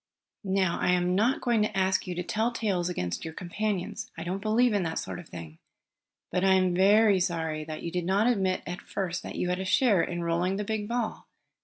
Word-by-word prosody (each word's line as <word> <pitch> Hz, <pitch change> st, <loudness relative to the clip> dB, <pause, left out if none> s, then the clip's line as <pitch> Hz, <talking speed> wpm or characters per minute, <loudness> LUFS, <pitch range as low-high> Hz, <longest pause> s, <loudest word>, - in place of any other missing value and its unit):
"Now 190 Hz, -3 st, +1 dB
I -, -, +1 dB
am 180 Hz, 0 st, +1 dB
not 220 Hz, +8 st, +2 dB
going 235 Hz, -3 st, +2 dB
to 210 Hz, -1 st, -1 dB
ask 190 Hz, 0 st, +1 dB
you 180 Hz, -, -3 dB
to 180 Hz, -, -2 dB
tell 220 Hz, +6 st, 0 dB
tales 195 Hz, -7 st, -1 dB
against 90 Hz, -, -3 dB
your 160 Hz, 0 st, -6 dB
companions. 190 Hz, +1 st, -3 dB
I 165 Hz, -, -5 dB
don't 185 Hz, +3 st, -3 dB
believe 225 Hz, +3 st, +3 dB
in 205 Hz, -, +2 dB
that 165 Hz, -2 st, -2 dB
sort -, -, -4 dB
of 175 Hz, -, -12 dB
thing. 80 Hz, -2 st, -9 dB, 0.7 s
But 180 Hz, +1 st, 0 dB
I 190 Hz, 0 st, +5 dB
am 185 Hz, -1 st, +2 dB
very 200 Hz, +2 st, +5 dB
sorry 160 Hz, -4 st, -1 dB
that 155 Hz, 0 st, -7 dB
you 170 Hz, -, -3 dB
did 180 Hz, -1 st, -2 dB
not 195 Hz, +4 st, +2 dB
admit 195 Hz, -6 st, +1 dB
at 175 Hz, +1 st, -5 dB
first 185 Hz, -3 st, -3 dB
that -, -, -7 dB
you 180 Hz, -, -1 dB
had 180 Hz, +1 st, -1 dB
a -, -, -2 dB
share 200 Hz, 0 st, +3 dB
in 175 Hz, -1 st, -3 dB
rolling 170 Hz, +3 st, 0 dB
the 205 Hz, -, -2 dB
big 210 Hz, 0 st, -3 dB
ball. 235 Hz, -1 st, -3 dB
185 Hz, 225 wpm, -28 LUFS, 175-210 Hz, 0.7 s, I